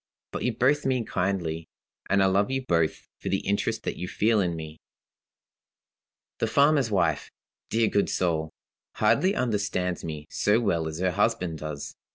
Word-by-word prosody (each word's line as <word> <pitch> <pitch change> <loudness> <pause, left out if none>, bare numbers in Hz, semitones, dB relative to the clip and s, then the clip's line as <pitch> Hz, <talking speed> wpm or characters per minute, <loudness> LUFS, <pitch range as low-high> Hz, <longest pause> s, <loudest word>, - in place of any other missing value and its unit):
But - - -4
you 125 -2 -1
both 140 +4 +3
mean 130 -3 0
kindly, 90 -5 -2 0.4
and 100 0 +4
I - - +4
love 100 +3 +2
you 135 -1 -2
both 85 -5 0
for - - -4
the 95 - 0
interest 100 +3 0
that - - -3
you 90 - -4
feel 110 +3 +2
in 90 -4 0
me. 80 -1 -8 1.6
"The 115 - +1
farmer's 140 0 +4
wife 85 -7 +1 0.4
dear 115 0 +2
good 100 -1 +1
soul! 80 -3 0 0.5
hardly 190 +2 +3
understands 100 -6 -1
me 75 -2 -5
so 105 +2 +2
well 85 -8 0
as 80 0 -5
her 90 +1 +1
husband 90 -5 0
does. 75 -2 -6
95 Hz, 165 wpm, -27 LUFS, 85-115 Hz, 1.6 s, and